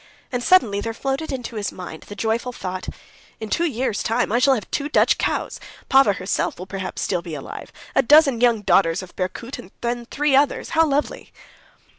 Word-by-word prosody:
And 245 Hz, -1 st, -2 dB
suddenly 230 Hz, -, +4 dB
there 225 Hz, +1 st, -4 dB
floated 275 Hz, +5 st, -3 dB
into 245 Hz, -4 st, -5 dB
his 205 Hz, -1 st, -2 dB
mind 175 Hz, -3 st, -9 dB
the 205 Hz, -, -8 dB
joyful 225 Hz, +4 st, -1 dB
thought: 185 Hz, -5 st, -5 dB, 0.5 s
"In 220 Hz, -, -6 dB
two 340 Hz, -, +1 dB
years' 255 Hz, -5 st, -2 dB
time 230 Hz, 0 st, 0 dB
I 235 Hz, -, +3 dB
shall 270 Hz, +1 st, +4 dB
have 215 Hz, -, -4 dB
two 290 Hz, 0 st, -2 dB
Dutch -, -, +3 dB
cows; -, -, -2 dB, 0.3 s
Pava 265 Hz, -7 st, +5 dB
herself 185 Hz, +1 st, -2 dB
will 185 Hz, -, -7 dB
perhaps 190 Hz, -1 st, -5 dB
still 180 Hz, -3 st, -1 dB
be 170 Hz, -3 st, -7 dB
alive, 140 Hz, -, -8 dB, 0.2 s
a -, -, +4 dB
dozen 275 Hz, -2 st, +5 dB
young 235 Hz, -4 st, +3 dB
daughters 185 Hz, -2 st, +3 dB
of 185 Hz, -, -13 dB
Berkoot 195 Hz, +7 st, -4 dB
and 180 Hz, -, -11 dB
the 240 Hz, 0 st, -2 dB
three 290 Hz, -1 st, +1 dB
others—how 305 Hz, +3 st, +2 dB
lovely!" 290 Hz, 0 st, -2 dB
235 Hz, 190 wpm, -22 LUFS, 195-270 Hz, 0.5 s, Pava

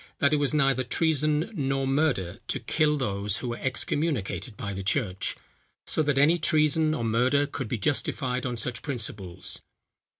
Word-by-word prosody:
that 140 Hz, +1 st, +3 dB
it -, -, +4 dB
was 145 Hz, -2 st, +1 dB
neither 135 Hz, -4 st, +3 dB
treason 155 Hz, -, +1 dB
nor 135 Hz, -5 st, -1 dB
murder 135 Hz, -, 0 dB
to -, -, -1 dB
kill 150 Hz, -1 st, +1 dB
those, 105 Hz, -4 st, 0 dB
who 125 Hz, -, -4 dB
were 120 Hz, -, -4 dB
excommunicated 130 Hz, -, -2 dB
by 100 Hz, -1 st, -4 dB
the 95 Hz, -, -5 dB
church. 95 Hz, -2 st, -1 dB, 0.5 s
So -, -, 0 dB
that 145 Hz, -2 st, +1 dB
any 155 Hz, +5 st, +5 dB
treason 155 Hz, 0 st, +3 dB
or 120 Hz, -, -3 dB
murder 125 Hz, +6 st, +2 dB
could 140 Hz, -3 st, -5 dB
be 115 Hz, -, -2 dB
justified 125 Hz, +2 st, -1 dB
on 125 Hz, -2 st, -3 dB
such 120 Hz, +2 st, -3 dB
principles. 105 Hz, -, -1 dB
135 Hz, 165 wpm, -27 LUFS, 115-150 Hz, 0.5 s, any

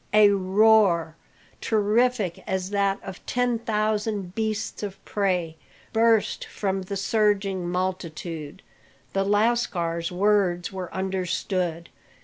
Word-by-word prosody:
A 210 Hz, -1 st, +7 dB
roar, 195 Hz, -4 st, +3 dB, 0.5 s
terrific 215 Hz, -2 st, +1 dB
as 190 Hz, 0 st, -2 dB
that 200 Hz, -1 st, +1 dB
of 195 Hz, -1 st, -9 dB
ten 245 Hz, -2 st, +1 dB
thousand 215 Hz, -3 st, -1 dB
beasts 220 Hz, 0 st, -2 dB
of 200 Hz, -2 st, -5 dB
prey, 180 Hz, -5 st, -1 dB, 0.4 s
burst 225 Hz, -1 st, +3 dB
from 195 Hz, -2 st, -2 dB
the 195 Hz, +2 st, -4 dB
surging 200 Hz, -3 st, +1 dB
multitude. 175 Hz, -2 st, -4 dB, 0.5 s
The 195 Hz, -, +1 dB
lascars 195 Hz, -6 st, +1 dB
words 185 Hz, -2 st, +1 dB
were 185 Hz, -2 st, -5 dB
understood. 185 Hz, -2 st, -2 dB
195 Hz, 105 wpm, -25 LUFS, 180-215 Hz, 0.5 s, A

